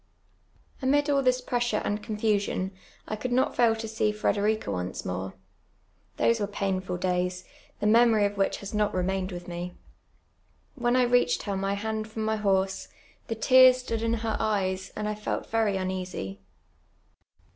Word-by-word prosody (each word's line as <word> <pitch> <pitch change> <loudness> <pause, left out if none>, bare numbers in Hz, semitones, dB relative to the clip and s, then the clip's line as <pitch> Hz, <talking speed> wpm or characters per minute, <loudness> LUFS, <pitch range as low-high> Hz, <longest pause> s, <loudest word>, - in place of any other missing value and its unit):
Amid 290 +2 +2
all 280 -1 +3
this 255 -1 +2
pressure 240 -3 0
and 205 +1 -1
confusion 210 -3 -1 0.4
I 215 - -2
could 245 +4 -4
not 255 +2 +2
fail 235 -2 +4
to 225 0 -5
see 215 -1 0
Frederiea 210 +1 0
once 90 -2 -3
more. 95 +1 -4 0.8
Those 230 -1 +3
were 205 - -1
painful 190 -3 -2
days, 180 0 -1 0.3
the - - -2
memon* 225 -1 +5
of 200 0 -1
which 195 -1 +1
has 200 - -7
not 210 -2 +1
remained 185 +1 -1
with 175 0 -7
mc. 175 +1 -5 1.0
When 240 -2 +1
I 255 - +5
reached 245 0 +2
her 200 -2 -2
my 195 +1 -1
hand 220 +1 -3
from 220 0 -4
my 220 0 0
horse, 195 -2 0 0.4
the 225 - -2
tears 255 +2 +7
stood 230 -3 -3
in 230 0 +1
her 220 - 0
eyes, 190 -3 -1
and 210 0 -3
I 210 - -1
felt 210 0 -4
very 220 -3 +2
uneasy. 185 - -4
210 Hz, 165 wpm, -27 LUFS, 190-230 Hz, 1.0 s, tears